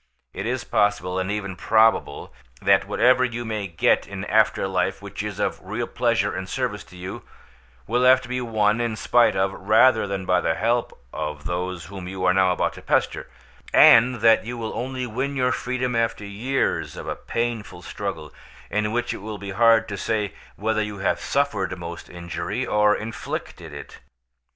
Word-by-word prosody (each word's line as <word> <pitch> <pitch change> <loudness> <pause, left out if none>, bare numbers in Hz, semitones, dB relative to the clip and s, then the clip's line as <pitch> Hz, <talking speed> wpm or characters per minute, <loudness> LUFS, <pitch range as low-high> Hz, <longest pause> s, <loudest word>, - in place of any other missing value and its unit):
It - - -4
is - - -2
possible, 95 -3 0
and 95 +1 -2
even 100 -2 -3
probable, 110 +4 +2 0.3
that 100 0 +3
whatever 125 +5 +4
you 120 -1 -2
may 110 -3 -3
get 85 -3 +2
in - - -6
after - - +2
life - - -1
which - - -7
is - - -5
of - - -1
real - - -3
pleasure - - 0
and - - -5
service - - -2
to 90 - -15
you, 90 +1 -7 0.6
will 120 +4 0
have 130 +1 +7
to - - -10
be 125 +1 -2
won 110 -1 +1
in 115 -2 -1
spite 120 -1 +3
of, 95 0 +1
rather 110 +4 +4
than 95 -1 -4
by 90 -1 +2
the 80 - 0
help 120 +1 -1
of, 75 -1 -5
those 90 0 -3
whom 95 +1 -8
you 95 0 -4
are 90 - +4
now 95 -1 +3
about 90 - 0
to - - -11
pester, - - 0 0.5
and 120 0 +7
that 115 0 +5
you 120 +2 -6
will 115 -1 -4
only 130 +1 -3
win 130 +5 -3
your 125 -1 +1
freedom 125 0 -2
after 115 -2 -1
years 115 +7 -1
of - - -7
a - - -2
painful 115 -6 -4
struggle 90 -4 -5 0.4
in 105 +1 0
which 120 +1 -1
it - - -6
will 105 +1 -6
be 100 0 -7
hard 115 +2 +4
to 105 - -5
say 105 -1 -1 0.2
whether 110 +1 0
you 105 -1 -4
have 95 - 0
suffered 105 -10 -1
most 85 -1 -8
injury, 90 +7 -4
or 105 0 +3
inflicted 105 -6 -6
it. 70 0 -10
105 Hz, 185 wpm, -23 LUFS, 95-120 Hz, 0.6 s, have